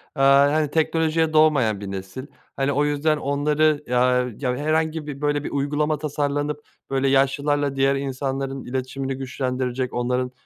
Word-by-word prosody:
aaa, 140 Hz, +1 st, +5 dB
hani, 155 Hz, -2 st, +1 dB
teknolojiye 160 Hz, 0 st, +1 dB
doğmayan 140 Hz, -9 st, +3 dB
bir 100 Hz, -1 st, -6 dB
nesil. 95 Hz, +8 st, -7 dB, 0.3 s
Hani, 135 Hz, +1 st, 0 dB
o 145 Hz, +1 st, +1 dB
yüzden 150 Hz, +1 st, +1 dB
onları 150 Hz, +1 st, +1 dB
ya 125 Hz, 0 st, +2 dB
ya 125 Hz, -3 st, -1 dB
herhangi 155 Hz, +1 st, -1 dB
bir, 140 Hz, -1 st, -7 dB
böyle, 145 Hz, -1 st, 0 dB
bir -, -, -5 dB
uygulama 145 Hz, +2 st, 0 dB
tasarlanıp, 145 Hz, 0 st, -2 dB, 0.3 s
böyle, 135 Hz, 0 st, +1 dB
yaşlılarla 140 Hz, +1 st, +1 dB
diğer 135 Hz, 0 st, +2 dB
insanların 135 Hz, 0 st, -3 dB
iletişimini 130 Hz, +1 st, -3 dB
güçlendirecek, 130 Hz, -1 st, -3 dB
onların 125 Hz, +1 st, -1 dB
140 Hz, 145 wpm, -23 LUFS, 130-150 Hz, 0.3 s, aaa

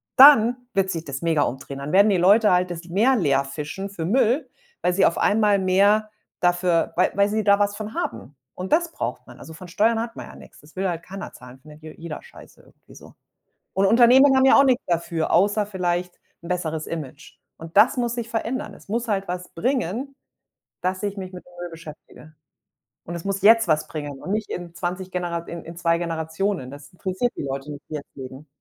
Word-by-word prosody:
dann 250 Hz, -3 st, +8 dB, 0.2 s
wird 195 Hz, -1 st, +1 dB
sich 165 Hz, -2 st, -4 dB
das 135 Hz, -1 st, -6 dB
mega 165 Hz, -3 st, +2 dB
umdrehen. 135 Hz, +2 st, -5 dB
Dann 140 Hz, +2 st, -5 dB
werden 200 Hz, +2 st, +6 dB
die 190 Hz, -, +3 dB
Leute 205 Hz, +4 st, +5 dB
halt 180 Hz, 0 st, +2 dB
das 170 Hz, 0 st, -6 dB
Meer 230 Hz, +9 st, +3 dB
leerfischen 150 Hz, -, -1 dB
für 175 Hz, -5 st, -6 dB
Müll, 250 Hz, -, +1 dB, 0.3 s
weil 180 Hz, -, +1 dB
sie 195 Hz, -, +3 dB
auf 170 Hz, -, +2 dB
einmal 210 Hz, -2 st, +3 dB
mehr 200 Hz, +3 st, +3 dB, 0.3 s
dafür 175 Hz, -1 st, +2 dB
wei 180 Hz, -, +3 dB
weil 200 Hz, +1 st, +2 dB
sie 215 Hz, 0 st, -1 dB
da 200 Hz, 0 st, +4 dB
was 205 Hz, 0 st, +1 dB
von 215 Hz, 0 st, -6 dB
haben 120 Hz, +5 st, -5 dB, 0.2 s
und 185 Hz, +7 st, -3 dB
das 340 Hz, +1 st, +2 dB
braucht -, -, -5 dB
man. -, -, -14 dB
Also 160 Hz, -, -11 dB
von 180 Hz, +3 st, -11 dB
Steuern 225 Hz, +5 st, +2 dB
hat 230 Hz, 0 st, -6 dB
man -, -, -8 dB
ja -, -, -13 dB
nix. -, -, -15 dB
Das 150 Hz, +4 st, -20 dB
will 190 Hz, 0 st, -1 dB
halt 170 Hz, -1 st, -4 dB
keiner 195 Hz, +1 st, -8 dB
zahlen, 125 Hz, +1 st, -14 dB
findet 150 Hz, +2 st, -15 dB
je 155 Hz, -, -9 dB
jeder 165 Hz, -2 st, -7 dB
scheiße -, -, -16 dB
irgendwie -, -, -21 dB
so -, -, -15 dB, 0.6 s
und 195 Hz, +1 st, +2 dB
Unternehmen 255 Hz, +5 st, +6 dB
haben 265 Hz, -, +4 dB
ja -, -, +6 dB
auch 280 Hz, -, +7 dB
nix 255 Hz, -2 st, +2 dB
dafür, 170 Hz, -1 st, -1 dB
außer 205 Hz, +4 st, +3 dB
vielleicht 180 Hz, -2 st, -3 dB, 0.2 s
'n -, -, -9 dB
besseres 160 Hz, -3 st, -2 dB
Image, 155 Hz, -2 st, -8 dB, 0.2 s
und 165 Hz, +1 st, -11 dB
das 255 Hz, +4 st, +6 dB
muss 240 Hz, -1 st, -1 dB
sich 235 Hz, -1 st, -5 dB
verändern. 240 Hz, +5 st, -3 dB
Es -, -, -16 dB
muss 230 Hz, +3 st, -2 dB
halt 195 Hz, -1 st, -1 dB
was 180 Hz, 0 st, -5 dB
bringen, 255 Hz, +4 st, -2 dB, 0.7 s
dass 185 Hz, +1 st, -2 dB
ich 205 Hz, 0 st, -3 dB
mich 185 Hz, 0 st, -7 dB
mit 180 Hz, -, -10 dB
Müll 175 Hz, -1 st, -6 dB
beschäftige, 155 Hz, -1 st, -13 dB, 0.7 s
und 170 Hz, -, -6 dB
es 170 Hz, -, -7 dB
muss 195 Hz, 0 st, -2 dB
jetzt 225 Hz, 0 st, +6 dB
was 155 Hz, -2 st, +1 dB
bringen 145 Hz, -3 st, -7 dB
und 190 Hz, -, -5 dB
nicht 215 Hz, +1 st, -2 dB
in 175 Hz, -1 st, -6 dB
20 185 Hz, +1 st, -4 dB
Genera 175 Hz, -2 st, -2 dB
in 170 Hz, 0 st, -7 dB
in 165 Hz, +1 st, -9 dB
2 170 Hz, -1 st, +1 dB
Generationen. 165 Hz, -2 st, -3 dB
Das 145 Hz, 0 st, -12 dB
interessiert 190 Hz, +7 st, -2 dB
die -, -, -4 dB
Leute 135 Hz, +2 st, -5 dB
nicht, 145 Hz, -, -9 dB
die 155 Hz, -, -5 dB
jetzt 145 Hz, -, -9 dB
leben. 130 Hz, +2 st, -10 dB
185 Hz, 215 wpm, -23 LUFS, 165-215 Hz, 0.7 s, dann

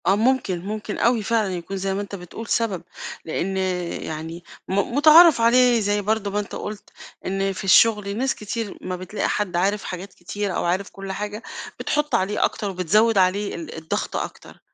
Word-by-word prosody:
آه 190 Hz, -, +5 dB
ممكن، 220 Hz, -6 st, +1 dB
ممكن 210 Hz, 0 st, -4 dB
أوي 235 Hz, -2 st, +2 dB
فعلًا 215 Hz, -3 st, +1 dB
يكون 180 Hz, +2 st, -5 dB
زي 195 Hz, 0 st, -1 dB
ما 195 Hz, -, -2 dB
أنت 200 Hz, 0 st, -6 dB
بتقول 195 Hz, +5 st, -9 dB
سبب، 205 Hz, -8 st, 0 dB, 0.4 s
لإن 190 Hz, +4 st, -2 dB, 0.5 s
يعني 160 Hz, +2 st, -6 dB, 0.2 s
م -, -, -3 dB, 0.2 s
مُتعارف 310 Hz, -1 st, +8 dB
عليه 240 Hz, +1 st, +5 dB
زي 205 Hz, 0 st, +1 dB
برضه 210 Hz, 0 st, -1 dB
ما 205 Hz, -, 0 dB
أنت 205 Hz, -, -5 dB
قُلت، 210 Hz, 0 st, -7 dB, 0.4 s
إن 195 Hz, +1 st, -1 dB
في 185 Hz, -, -7 dB
الشُّغل 205 Hz, +1 st, +4 dB
ناس 265 Hz, +2 st, 0 dB
كتير، 210 Hz, 0 st, -5 dB
ما 185 Hz, -, -4 dB
بتلاقي 185 Hz, +3 st, -3 dB
حد 205 Hz, -4 st, -1 dB
عارف 195 Hz, +4 st, +1 dB
حاجات 185 Hz, +1 st, -6 dB
كتير 200 Hz, +2 st, -4 dB
أو -, -, -1 dB
عارف 185 Hz, +3 st, 0 dB
كُلّ 195 Hz, 0 st, -7 dB
حاجة، 210 Hz, +3 st, -5 dB, 0.4 s
بتحُطّ 295 Hz, -3 st, 0 dB
عليه 205 Hz, -1 st, +1 dB
أكتر 210 Hz, -3 st, -3 dB
وبتزوِّد 200 Hz, +5 st, +2 dB
عليه 190 Hz, +2 st, +2 dB
ال 165 Hz, -2 st, -7 dB
الضغط 160 Hz, 0 st, -3 dB
أكتر، -, -, -6 dB
200 Hz, 180 wpm, -23 LUFS, 185-220 Hz, 0.5 s, مُتعارف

